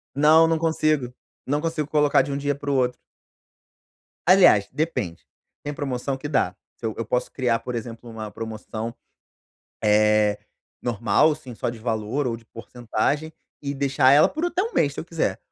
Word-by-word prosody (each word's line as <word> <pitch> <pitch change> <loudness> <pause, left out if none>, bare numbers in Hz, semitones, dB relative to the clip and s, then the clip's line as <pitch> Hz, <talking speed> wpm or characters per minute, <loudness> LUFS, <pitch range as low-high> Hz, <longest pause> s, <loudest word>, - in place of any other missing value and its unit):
Não, 155 +3 +6
não 165 0 +2
consigo, 155 -5 0 0.3
não 145 +3 0
consigo 160 -2 -2
colocar 150 -2 +4
de 140 +2 -4
um 140 - -2
dia 145 0 0
para 145 +1 -6
o 140 - +1
outro. 125 -1 +1 1.3
Aliás, 180 - +6
depende: 130 - -2 0.4
tem 145 - -4
promoção 135 -1 -3
que 135 - -6
dá. 130 -11 0 0.2
Que - - -8
eu 110 - -1
eu 115 - -3
posso 125 +3 -1
criar, 120 -3 0
por 125 - -5
exemplo, 115 +1 -7
uma 110 -1 -6
promoção, 110 +1 -6 0.9
eh, 105 -1 +3 0.4
normal, 115 +5 +2
assim, 145 -5 -8
só - - -3
de 120 -1 -5
valor 110 +4 -2
ou 115 -2 -1
de 115 - -17
porcentagem, 120 +7 -3 0.3
e 140 0 -3
deixar 135 -1 +3
ela 145 +2 +6
por 315 +2 -3
até 350 +1 0
1 455 +3 -4
mês, - - +1
se - - -5
eu - - -7
quiser. - - -1
130 Hz, 180 wpm, -24 LUFS, 115-150 Hz, 1.3 s, Não